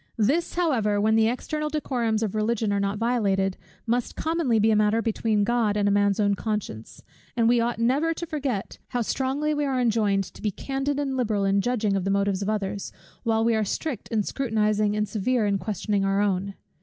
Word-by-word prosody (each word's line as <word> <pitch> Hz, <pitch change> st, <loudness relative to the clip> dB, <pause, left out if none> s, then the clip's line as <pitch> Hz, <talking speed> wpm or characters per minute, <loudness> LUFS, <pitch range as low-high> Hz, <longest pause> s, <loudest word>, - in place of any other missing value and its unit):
This 275 Hz, +11 st, +1 dB
however, 235 Hz, -12 st, +1 dB
when 215 Hz, +2 st, +2 dB
the 220 Hz, 0 st, +4 dB
external 300 Hz, +6 st, -2 dB
decorums 240 Hz, -7 st, -1 dB
of 210 Hz, -, -2 dB
Religion 215 Hz, -1 st, 0 dB
are 200 Hz, -, +1 dB
not 200 Hz, +1 st, -1 dB
violated, 200 Hz, -5 st, +1 dB, 0.3 s
must 240 Hz, +1 st, -1 dB
commonly 320 Hz, -8 st, 0 dB
be 220 Hz, +1 st, +3 dB
a -, -, +3 dB
matter 210 Hz, +1 st, +3 dB
between 220 Hz, -2 st, 0 dB
God 220 Hz, -2 st, +1 dB
and 205 Hz, -1 st, +2 dB
a -, -, +3 dB
man's 200 Hz, 0 st, +2 dB
own 205 Hz, -1 st, +3 dB
conscience; 200 Hz, -, -4 dB, 0.3 s
and 230 Hz, -1 st, +3 dB
we 240 Hz, 0 st, +4 dB
ought 235 Hz, 0 st, -1 dB
never 265 Hz, +8 st, +2 dB
to 335 Hz, +1 st, -4 dB
forget 275 Hz, -, -3 dB
how 245 Hz, -2 st, -1 dB
strongly 275 Hz, +6 st, -1 dB
we 295 Hz, 0 st, -1 dB
are 270 Hz, -2 st, 0 dB
enjoined 215 Hz, -5 st, +2 dB
to -, -, -13 dB
be 215 Hz, -, 0 dB
candid 270 Hz, +7 st, -3 dB
and 275 Hz, -2 st, -1 dB
liberal 215 Hz, -6 st, 0 dB
in 195 Hz, 0 st, +2 dB
judging 215 Hz, -3 st, 0 dB
of 195 Hz, -, -1 dB
the 195 Hz, -, -1 dB
motives 200 Hz, -1 st, +1 dB
of 200 Hz, -, -1 dB
others, 205 Hz, -2 st, -3 dB, 0.3 s
while 225 Hz, -1 st, +1 dB
we 230 Hz, -, +3 dB
are 220 Hz, -1 st, +1 dB
strict 250 Hz, -, -3 dB
in 220 Hz, -3 st, 0 dB
scrutinizing 215 Hz, -4 st, 0 dB
and 210 Hz, 0 st, 0 dB
severe 225 Hz, +3 st, 0 dB
in 200 Hz, -1 st, +1 dB
questioning 205 Hz, +1 st, -1 dB
our 195 Hz, 0 st, +1 dB
own. 195 Hz, -1 st, 0 dB
220 Hz, 205 wpm, -25 LUFS, 205-245 Hz, 0.3 s, the